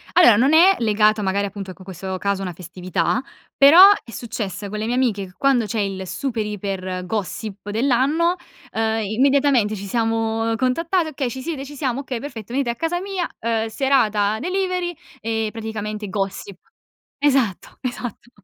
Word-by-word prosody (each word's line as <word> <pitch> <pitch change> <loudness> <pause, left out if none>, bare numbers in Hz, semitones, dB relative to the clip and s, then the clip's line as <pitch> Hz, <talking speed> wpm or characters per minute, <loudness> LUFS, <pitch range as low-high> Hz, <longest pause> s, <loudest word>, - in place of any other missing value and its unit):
Allora 290 -12 +7
non 265 +6 +3
è 370 +4 +7
legato 215 -1 +3
magari 200 +1 0
appunto 195 -1 -7
ecco 185 0 -12
questo 190 0 -5
caso 200 0 -1
a - - -3
una 180 - -4
festività, 180 +7 -2 0.3
però 285 +6 +8 0.2
è 235 - -12
successo 215 -3 -5
con 210 +1 -5
le 215 - -2
mie 240 +2 -1
amiche 220 -7 +1
che 180 - -16
quando 270 -4 +3
c'è 215 0 -2
il 190 -2 -3
super 235 0 -2
iper 190 -3 -4
gossip 205 0 -4
dell'anno, 275 - +2 0.4
uhm, 225 0 0
immediatamente 255 0 +2
ci 200 0 -6
siamo 225 +1 0
contattate: 330 +7 +1
"Okay 270 -4 -3
ci 260 - -6
siete?" 285 -2 -4
"Ci 290 +1 -10
siamo", 265 -2 -1
"Okay 260 -4 -4
perfetto 235 -5 -8
venite 270 -2 0
a 235 - -3
casa 335 +4 -1
mia" 380 -2 -2
uhm 225 -1 0
serata 220 -4 +2
delivery 365 - -1 0.3
e 225 0 -1
praticamente 215 -2 -5
gossip. 195 -1 -4 0.6
Esatto, 270 -9 +1
esatto. 245 -2 -5
225 Hz, 165 wpm, -21 LUFS, 205-275 Hz, 0.6 s, però